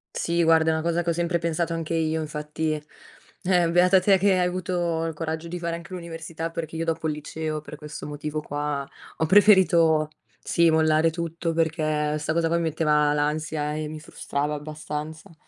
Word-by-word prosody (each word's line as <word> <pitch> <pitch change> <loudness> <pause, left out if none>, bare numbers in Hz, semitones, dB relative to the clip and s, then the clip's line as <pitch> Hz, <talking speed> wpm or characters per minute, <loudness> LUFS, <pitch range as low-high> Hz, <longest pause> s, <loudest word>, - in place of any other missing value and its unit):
Sì 170 0 +1
guarda 160 0 +4
è - - +3
una 160 - -2
cosa 170 0 +1
che 170 - -2
ho - - +2
sempre 170 0 0
pensato 170 0 -1
anche 165 0 -2
io, 160 0 0
infatti, 155 +1 -3 0.7
eh, 175 -2 +3
beata 180 +2 +5
te 195 -1 +4
che 200 0 +4
hai 180 - +2
avuto 175 -2 -1
il 165 - -3
coraggio 160 +1 -4
di 175 +1 -5
fare 170 -1 -3
anche 170 +3 -10
l'università, 165 -1 -6
perché 165 -1 -5
io 165 +1 -2
dopo 165 -1 -1
il 155 - 0
liceo, 155 0 -4
per 150 0 -10
questo 150 0 -8
motivo 150 +1 -4
qua 145 -2 -3 0.3
ho 160 - +1
preferito 170 -5 +5 0.3
sì, 170 -1 +3
mollare 160 0 +3
tutto, 165 0 -3
perché 155 -2 0
sta 150 +1 -2
cosa 165 0 +1
qua 170 +1 +1
mi - - 0
metteva 150 -2 +2
l'ansia 150 0 -1
e 155 0 -3
mi 155 0 -7
frustrava 150 -1 -3
abbastanza. 155 +1 -6
160 Hz, 190 wpm, -25 LUFS, 155-170 Hz, 0.7 s, beata